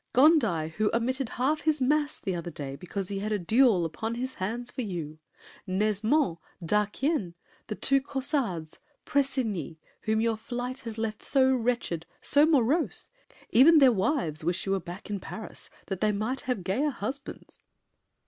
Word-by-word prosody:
Gondi, 240 Hz, -, +4 dB
who 215 Hz, -1 st, +2 dB
omitted 255 Hz, +1 st, 0 dB
half 280 Hz, +5 st, +1 dB
his 310 Hz, -1 st, +1 dB
Mass 295 Hz, +3 st, +1 dB
The 190 Hz, -, -3 dB
other 170 Hz, 0 st, -4 dB
day, 140 Hz, -4 st, -6 dB
because 185 Hz, +4 st, -5 dB
he 200 Hz, -1 st, -2 dB
had 210 Hz, +2 st, -3 dB
a 210 Hz, -, +2 dB
duel 215 Hz, -1 st, +4 dB
Upon 220 Hz, +9 st, -3 dB
his 255 Hz, +2 st, -3 dB
hands 235 Hz, +6 st, -4 dB
for -, -, -4 dB
you? 165 Hz, -8 st, -5 dB, 0.5 s
Nesmond, 210 Hz, -, +1 dB, 0.3 s
D'Arquien, 210 Hz, -, 0 dB, 0.3 s
The 215 Hz, -, -3 dB
two 275 Hz, +4 st, +2 dB
Caussades, 265 Hz, -, -3 dB, 0.3 s
Pressigny, 240 Hz, -, -1 dB, 0.3 s
whom 220 Hz, 0 st, +2 dB
your 225 Hz, 0 st, +1 dB
flight 245 Hz, +3 st, -4 dB
Has 230 Hz, -2 st, -7 dB
left 220 Hz, -1 st, -3 dB
so 265 Hz, -1 st, +3 dB
wretched, 235 Hz, -9 st, -1 dB
so 290 Hz, +2 st, +4 dB
morose, 300 Hz, +2 st, +2 dB, 0.4 s
even 305 Hz, +7 st, +7 dB
Their 270 Hz, -4 st, +7 dB
wives 190 Hz, -, 0 dB
wish 175 Hz, +3 st, -1 dB
you 195 Hz, -, -1 dB
were 195 Hz, -, +2 dB
back 180 Hz, +3 st, -9 dB
in 200 Hz, -, -2 dB
Paris, 220 Hz, +3 st, -9 dB, 0.2 s
that 195 Hz, -2 st, -4 dB
They 215 Hz, -, +3 dB
might 220 Hz, +6 st, -2 dB
have 245 Hz, -7 st, -1 dB
gayer 255 Hz, +12 st, +1 dB
husbands! 270 Hz, +3 st, -6 dB
225 Hz, 160 wpm, -28 LUFS, 190-265 Hz, 0.5 s, even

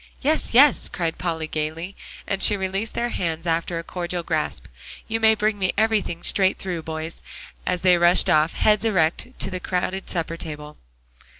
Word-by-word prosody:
"Yes, 300 Hz, -4 st, 0 dB
yes," 280 Hz, +1 st, +5 dB
cried 165 Hz, -3 st, -3 dB
Polly 165 Hz, -3 st, -2 dB
gaily, 155 Hz, +4 st, -4 dB, 0.3 s
and 195 Hz, -, -3 dB
she 210 Hz, -, +7 dB
released 195 Hz, +3 st, -3 dB
their 240 Hz, 0 st, -1 dB
hands 165 Hz, -5 st, -3 dB
after 165 Hz, +1 st, -1 dB
a 165 Hz, -, -4 dB
cordial 175 Hz, 0 st, -4 dB
grasp. 155 Hz, -, -3 dB, 0.4 s
"You 225 Hz, 0 st, -2 dB
may 220 Hz, 0 st, +5 dB
bring 210 Hz, -1 st, -1 dB
me 185 Hz, -1 st, 0 dB
everything 210 Hz, -6 st, 0 dB
straight 190 Hz, -1 st, +4 dB
through, 180 Hz, -3 st, -4 dB
boys," 160 Hz, +1 st, -6 dB, 0.5 s
as 180 Hz, -1 st, 0 dB
they 180 Hz, -2 st, +4 dB
rushed 175 Hz, +1 st, +5 dB
off, 155 Hz, +2 st, +3 dB
heads 210 Hz, -1 st, +2 dB
erect, 185 Hz, -4 st, +1 dB
to -, -, -3 dB
the 185 Hz, -, -4 dB
crowded 185 Hz, +1 st, -3 dB
supper 165 Hz, -1 st, -3 dB
table. 150 Hz, -2 st, -6 dB
180 Hz, 175 wpm, -23 LUFS, 165-200 Hz, 0.5 s, she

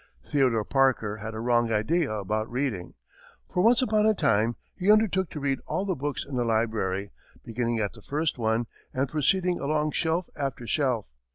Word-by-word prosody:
Theodore 125 Hz, -7 st, +2 dB
Parker 130 Hz, -6 st, +2 dB
had 110 Hz, +1 st, -6 dB
a -, -, -4 dB
wrong 120 Hz, 0 st, +2 dB
idea 145 Hz, +9 st, +1 dB
about 110 Hz, +1 st, -2 dB
reading, 125 Hz, -8 st, -2 dB, 0.6 s
for 180 Hz, -, +2 dB
once 235 Hz, +5 st, +5 dB
upon 215 Hz, -3 st, +3 dB
a 220 Hz, -, +4 dB
time 115 Hz, -, +2 dB, 0.2 s
he 190 Hz, +3 st, +3 dB
undertook 195 Hz, -4 st, +3 dB
to 150 Hz, -, -6 dB
read 140 Hz, -1 st, 0 dB
all 195 Hz, -, -1 dB
the 195 Hz, -, 0 dB
books 145 Hz, -1 st, -3 dB
in 135 Hz, -3 st, -3 dB
a -, -, +2 dB
library, 110 Hz, -4 st, 0 dB, 0.3 s
beginning 120 Hz, 0 st, -1 dB
at 105 Hz, -2 st, -1 dB
the 110 Hz, -, -14 dB
first 150 Hz, +3 st, -2 dB
one 110 Hz, +1 st, +1 dB, 0.3 s
and 135 Hz, +2 st, +1 dB
proceeding 180 Hz, +5 st, +1 dB
along 150 Hz, +1 st, 0 dB
shelf 165 Hz, +3 st, 0 dB
after 135 Hz, -4 st, -3 dB
shelf. 125 Hz, -3 st, 0 dB
130 Hz, 180 wpm, -27 LUFS, 110-160 Hz, 0.6 s, once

